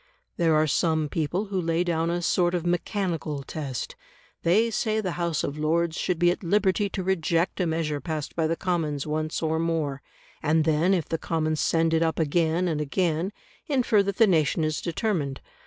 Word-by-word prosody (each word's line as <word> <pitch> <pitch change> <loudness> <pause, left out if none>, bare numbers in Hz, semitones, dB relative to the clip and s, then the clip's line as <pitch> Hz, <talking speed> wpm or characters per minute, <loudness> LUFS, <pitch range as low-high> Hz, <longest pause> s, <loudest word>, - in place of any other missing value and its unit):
There 165 -3 +3
are 155 0 +4
some 155 0 +1
people 165 +7 -1
who 195 -2 -2
lay 165 +1 +1
down 165 -1 0
a 175 0 -1
sort 175 +1 +2
of 175 -1 -2
mechanical 175 -4 -1
test; 135 -4 -5 0.5
they 215 +7 +3
say 220 0 0
the 190 -4 -2
House 170 -2 -1
of 145 +2 -3
Lords 160 +2 +1
should 180 -1 -1
be 175 +1 +4
at - - -4
liberty 200 +2 +1
to 190 - -4
reject 175 -1 0
a 180 - +1
measure 160 -3 -1
passed 155 +1 -4
by 160 -2 +1
the 165 - 0
Commons 160 -6 -1
once 155 +1 -2
or 160 0 +1
more, 160 -4 -1 0.4
and 155 +1 +2
then 160 +4 +3
if 170 -5 -2
the 165 - -2
Commons 155 -2 -1
send 165 0 +2
it 160 - +3
up 165 -1 +1
again 165 +2 +1
and 155 -3 -1
again, 165 +4 0 0.4
infer 250 -8 +3
that 200 -1 -2
the 225 - +7
nation 160 -4 +2
is 155 0 -1
determined. 170 - -2
165 Hz, 190 wpm, -26 LUFS, 155-180 Hz, 0.5 s, the